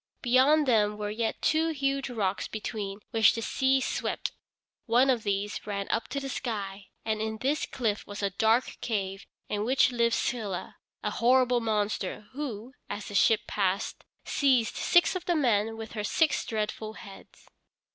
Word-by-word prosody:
Beyond 270 +4 +4
them 210 -3 +3
were 210 0 -3
yet 220 +1 -2
two 320 +1 +3
huge 275 -3 -1
rocks 200 -5 -1
between 210 -2 -5
which 225 -2 +5
the 230 - -3
sea 265 +2 +2
swept. - - -2 0.6
One 250 +4 +5
of 245 -3 0
these 205 0 -2
ran 200 -1 -3
up 230 - 0
to 280 - -3
the 275 - -5
sky, 205 -7 -4 0.2
and 215 -1 -1
in 220 0 -2
this 280 +7 0
cliff 220 -5 -2
was 205 0 -6
a 200 - +1
dark 220 +5 +2
cave 195 -4 -3 0.2
in 210 0 -2
which 255 +2 +3
lived 235 -1 +2
Scylla 215 -7 -3 0.3
a - - -1
horrible 250 0 +3
monster, 210 -3 -1
who, 255 -4 -5 0.2
as 205 0 -5
the - - -8
ship 220 +2 +4
passed 195 0 -1 0.2
seized 255 -6 +2
six 350 +2 +3
of 370 - -4
the 350 - +1
men 225 -6 +1
with 225 -1 -7
her 210 -2 -4
six 315 +9 +2
dreadful 215 0 -3
heads. 195 -2 -13
225 Hz, 165 wpm, -28 LUFS, 205-255 Hz, 0.6 s, which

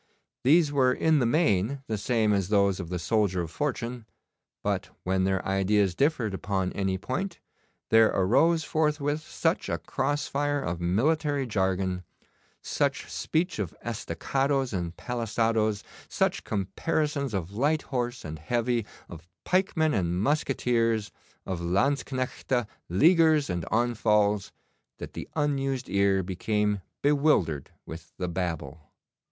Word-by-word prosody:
These 150 +3 +5
were 130 -3 +3
in 155 +4 +3
the 120 - +2
main 130 - +1
the 110 - -2
same 110 0 +1
as 100 -2 0
those 100 -2 +3
of 85 -3 -5
the 90 - -2
soldier 95 -2 +1
of 80 - -7
fortune, 120 -4 -3 0.6
but - - -1
when 95 0 +1
their 95 -1 0
ideas 95 0 +2
differed 130 - +1
upon 95 -1 -2
any 95 -1 -1
point, 170 - -4 0.5
there 110 0 +7
arose 140 - +3
forthwith 150 -1 0
such - - -1
a - - 0
cross 145 0 -2
fire 145 +1 0
of 85 -10 -3
military 140 - +1
jargon, 95 -4 0 0.6
such - - -1
speech 165 - -1
of 95 -6 -3
estacados 130 - -1
and 85 -2 -3
palisados, 115 -3 0 0.2
such - - 0
comparisons 140 - -1
of 90 -1 -3
light 145 +7 +1
horse 125 - -3
and 80 -1 -6
heavy, 120 +5 0 0.2
of 85 0 -11 0.2
pikemen 180 -4 +1
and 90 -3 0
musqueteers, 115 -4 +1 0.3
of 95 -3 -3
Lanzknechte, 130 +5 0 0.2
Leaguers, 155 - +4
and 85 -3 -2
on 120 +2 +1
falls, 105 -2 +2 0.5
that - - -8
the - - -7
unused 135 -4 0
ear 100 -1 +3
became 105 +2 -1 0.2
bewildered 140 - +2 0.2
with 80 0 -10
the 90 - -2
babble. 80 -4 -4
110 Hz, 130 wpm, -27 LUFS, 95-140 Hz, 0.6 s, there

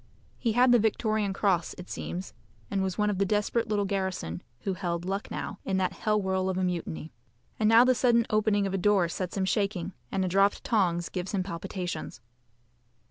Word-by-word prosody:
He 230 -3 +1
had 245 +2 +5
the 240 - +6
Victoria 215 -1 +1
Cross 190 -4 0
it 180 - -9
seems, 180 +2 -5 0.4
and 195 -1 +1
was 190 -1 -2
one 210 -1 +2
of 195 - -3
the - - +4
desperate 210 +3 0
little 205 -1 +1
garrison 190 - -2 0.2
who 195 - -1
held 175 -2 -3
Lucknow 195 +1 -4
in 190 - -1
that 185 -1 0
hell 215 -1 +1
whirl 190 -1 0
of 185 - -1
a 185 - 0
mutiny. 170 -3 -3 0.5
And 215 -1 +3
now 225 +2 +8
the 255 0 +4
sudden 235 -2 +3
opening 215 -1 +2
of 195 - -2
a 195 - 0
door 195 -2 +3
sets 180 +2 -4
him 190 - +1
shaking, 195 -3 -1 0.2
and 190 -1 0
a - - 0
dropped 195 +3 +2
tongs 175 -7 +1
gives 185 +2 -3
him 190 - +1
palpitations. 175 -4 -5
195 Hz, 195 wpm, -28 LUFS, 185-210 Hz, 0.5 s, now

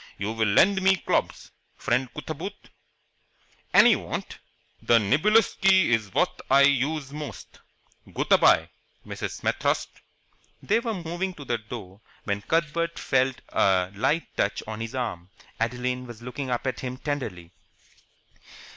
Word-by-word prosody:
You 100 +2 -3
will 110 -1 0
lend 190 - +4
me 190 0 +5
clobs, - - -2 0.3
friend 130 -1 0
Cootaboot?" 160 +8 -7 1.0
"Any - - +7
you - - +2
want." - - -6 0.4
"The 120 - +4
niblicksky 190 - +3
is 110 -4 +1
what - - 0
I 135 +1 +6
use 140 +1 +1
most. 150 -1 -8 0.5
Goot - - -3
a - - +7
bye, - - +4 0.3
Mrs. - - -5
Smet - - -2
thirst." - - 0 0.7
They 215 +3 +1
were 230 -2 -3
moving 175 +2 -4
to 145 - -10
the 120 -2 -1
door, 105 -3 -9 0.2
when 100 0 -2
Cuthbert 170 +4 -1
felt 130 -1 0
a 95 -1 +2
light 150 +11 0
touch 100 - -1
on 110 0 -6
his 115 +3 -5
arm. 105 -8 -4 0.3
Adeline 125 +2 -2
was 120 -1 -11
looking 125 +2 -5
up 120 +1 -2
at 130 - -2
him 125 -1 -5
tenderly. 110 - -5
130 Hz, 145 wpm, -26 LUFS, 110-165 Hz, 1.0 s, Any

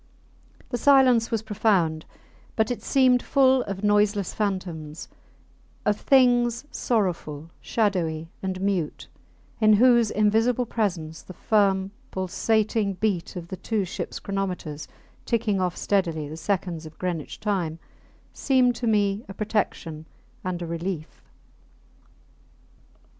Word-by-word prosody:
The 245 - -2
silence 255 -4 +5
was 225 -2 -1
profound; 190 -7 +1 0.5
but 220 +2 +1
it 245 - -3
seemed 255 -3 +3
full 265 -1 +4
of 195 0 -5
noiseless 205 -1 +2
phantoms, 175 -7 -3 0.8
of 210 - +3
things 245 -2 +3
sorrowful, 170 - -2
shadowy, 170 -8 0
and 190 -1 -3
mute, 190 -6 -1 0.5
in 215 -1 +5
whose 235 0 +5
invisible 225 +4 +2
presence 175 -9 -2
the 185 - -12
firm, 195 -3 +2 0.2
pulsating 210 +2 0
beat 190 -3 -2
of 170 -1 -7
the 190 - -5
two 215 -1 -1
ships 180 - -5
chronometers 180 -7 -4 0.4
ticking 215 -5 0
off 180 -2 -1
steadily 165 -7 0
the 155 - -7
seconds 170 -2 -2
of 155 - -15
Greenwich 175 -5 -4
Time 185 -7 -1 0.6
seemed 255 -3 +2
to 240 - -2
me 205 -1 +1
a 195 - -8
protection 180 -7 -2 0.4
and 180 -1 -3
a - - -3
relief. 170 -1 -5
200 Hz, 120 wpm, -25 LUFS, 175-225 Hz, 0.8 s, silence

